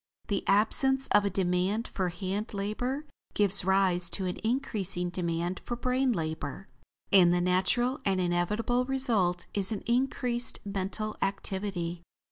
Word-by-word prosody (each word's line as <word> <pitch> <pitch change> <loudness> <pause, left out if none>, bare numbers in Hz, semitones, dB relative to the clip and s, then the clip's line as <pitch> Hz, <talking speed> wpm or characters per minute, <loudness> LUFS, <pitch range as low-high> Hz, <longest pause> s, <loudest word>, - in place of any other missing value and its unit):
The 200 -2 0
absence 265 +6 +3
of 205 -1 +4
a - - +2
demand 190 +4 0
for 185 -2 -2
hand 195 +4 -4
labor 245 +9 -2 0.3
gives 200 -2 +2
rise 185 -2 +2
to 190 - -3
an 180 - -3
increasing 205 -8 -1
demand 175 0 -2
for 240 - -3
brain 255 +2 +1
labor, 160 -2 -4 0.4
and 180 -3 +6
the 175 - +2
natural 190 - +1
and 190 -1 +1
inevitable 210 +8 0
result 225 -10 0
is 200 +1 +1
an 210 - -3
increased 245 0 +2
mental 200 +2 -3
activity. 190 -3 -3
195 Hz, 135 wpm, -29 LUFS, 180-235 Hz, 0.4 s, and